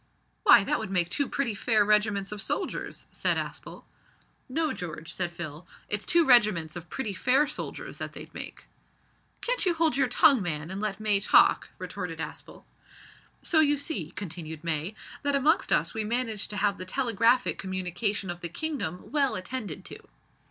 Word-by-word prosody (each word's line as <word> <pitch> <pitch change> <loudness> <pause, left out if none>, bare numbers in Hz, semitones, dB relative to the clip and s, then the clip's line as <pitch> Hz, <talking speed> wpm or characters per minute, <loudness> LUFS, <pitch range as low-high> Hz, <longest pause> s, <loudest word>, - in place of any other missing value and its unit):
"Why, - - +7
that - - 0
would - - -5
make 175 -2 +1
two 285 - 0
pretty 270 -5 -1
fair 215 +1 +2
regiments 210 -1 +2
of 210 -1 -4
soldiers," - - -3
said - - +1
Aspel. - - -6 0.7
"No, 310 +4 0
George," 165 -2 -6
said 175 -2 -2
Phil, 170 -1 -7 0.2
"it's 210 0 0
two 340 -1 +4
regiments 210 - +4
of 175 0 -8
pretty 230 -7 -3
fair 255 - +3
soldiers 300 +1 -6
that - - -4
they'd - - -10
make." - - -7 0.8
"Can't - - 0
you 360 -3 +2
hold 320 -4 +2
your 270 -1 +3
tongue, 250 0 +5
man, 160 -2 -3
an' 190 - -4
let 210 -1 -2
May 210 -2 +3
talk?" 200 - +4
retorted - - -5
Aspel. - - -7 0.8
"So, 320 - +3
you 295 -2 +4
see," 225 - -2
continued 160 -4 -6
May, 165 +4 -2 0.3
"that 285 -1 +1
amongst 295 +4 +2
us - - +2
we 220 - -2
manage 225 -1 -1
to 210 - -6
have 200 0 +1
the 185 - -4
telegraphic 235 +2 +2
communication 190 +1 -1
of 175 0 -8
the 170 - -3
kingdom 190 - -4
well 280 -3 +2
attended 200 - -5
to." - - -8
210 Hz, 175 wpm, -28 LUFS, 180-265 Hz, 0.8 s, Why